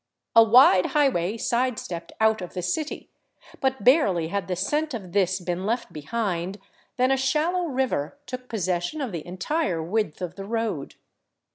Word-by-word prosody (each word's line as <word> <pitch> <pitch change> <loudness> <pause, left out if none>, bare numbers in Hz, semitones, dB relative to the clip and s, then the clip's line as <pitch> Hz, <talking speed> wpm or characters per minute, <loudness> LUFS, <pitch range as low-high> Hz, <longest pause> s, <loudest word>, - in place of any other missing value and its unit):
A 230 - +10
wide 225 -5 +6
highway 225 - +2
sidestepped 230 -9 -2
out 220 -2 +3
of 180 - -8
the 180 - -3
city; 295 - -3 0.5
but 265 -5 -1
barely 200 - +4
had 200 -1 -2
the 185 - -1
scent 295 - -1
of 190 -6 -7
this 190 0 +1
been 175 0 -3
left 235 +4 -2
behind 185 +2 -3 0.4
than 255 +1 +3
a 270 - +3
shallow 310 +7 +1
river 260 - -1
took 255 0 -7
possession 185 - -2
of 265 -6 -3
the 170 -4 -5
entire 180 - -1
width 205 0 -1
of 180 -2 -4
the 195 - -6
road. 220 -9 -3
210 Hz, 160 wpm, -25 LUFS, 180-255 Hz, 0.5 s, A